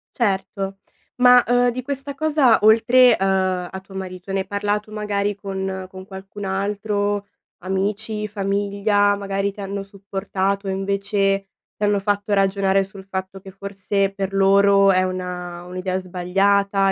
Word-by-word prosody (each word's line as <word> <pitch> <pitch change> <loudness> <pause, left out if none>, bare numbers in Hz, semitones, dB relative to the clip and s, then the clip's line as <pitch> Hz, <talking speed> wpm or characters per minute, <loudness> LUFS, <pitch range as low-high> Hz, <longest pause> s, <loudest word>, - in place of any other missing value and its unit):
Certo, 195 -3 -1 0.4
ma, 250 -1 +7
uhm, 245 0 +3
di 255 +2 -4
questa 280 +1 -5
cosa 295 -6 +3
oltre, 235 +3 +6
uhm, 190 -2 +1
a 190 - -6
tuo 195 0 -15
marito, 185 0 -7
ne 195 - 0
hai 190 - -4
parlato 205 +1 -2
magari 205 -1 -1
con 190 -1 -4
con 185 0 -10
qualcun 195 +1 -9
altro, 205 +1 -1 0.3
amici, 210 +3 -2
famiglia, 205 0 +1
magari 195 0 -2
ti 200 - -10
hanno 195 0 -4
supportato 195 0 -3
e - - 0
invece, 195 0 0 0.3
ti 210 - -6
hanno 205 -1 +2
fatto 205 +1 -1
ragionare 195 0 +2
sul 195 0 -11
fatto 190 0 -5
che 190 0 -12
forse 195 0 -2
per 195 0 -4
loro 195 0 +5
è 185 0 +3
una 180 -1 -5
un'idea 185 +1 -3
sbagliata 195 +2 +1
195 Hz, 145 wpm, -21 LUFS, 190-205 Hz, 0.4 s, ma